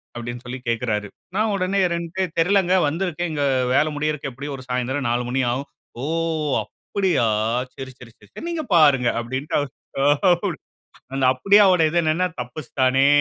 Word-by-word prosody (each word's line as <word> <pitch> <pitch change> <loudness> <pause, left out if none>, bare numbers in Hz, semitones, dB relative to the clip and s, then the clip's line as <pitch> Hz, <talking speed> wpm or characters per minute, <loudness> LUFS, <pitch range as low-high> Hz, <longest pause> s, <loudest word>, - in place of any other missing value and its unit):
அப்டின்னு 120 +1 -6
சொல்லி 125 +1 -6
கேக்குறாரு. 110 -3 -1 0.3
நான் 215 +1 +1
உடனே 195 +1 0
ரென்டு 170 +2 -5
எ - - -5
"தெரிலங்க, 185 +1 +3
வந்திருக்கேன். 175 +1 -2
இங்க 145 -2 0 0.3
வேல 155 - +4
முடியறக்கு 150 -1 -2
எப்டியும் 140 +3 -6
ஒரு 130 - -11
சாயந்திரம் 125 +1 -1
4 120 +1 0
மணி 135 +1 0
ஆகும்." 135 +3 -4 0.3
"ஓ! - - -2 0.6
அப்டியா! 180 - -1 0.5
சரி, 135 -1 -7
சரி, 120 -1 -13
சரி 105 - -11
நீங்க 335 -2 -2
பாருங்க" 140 -7 +5
அப்டிண்ட்டு 130 +7 -2 1.6
அந்த 135 - -1
அப்டியாவோட 190 +4 +5
இது 170 - -1
என்னான்னா, 160 +3 +1
தப்பிச்சுட்டானே! 130 +1 +1
145 Hz, 140 wpm, -22 LUFS, 125-175 Hz, 1.6 s, பாருங்க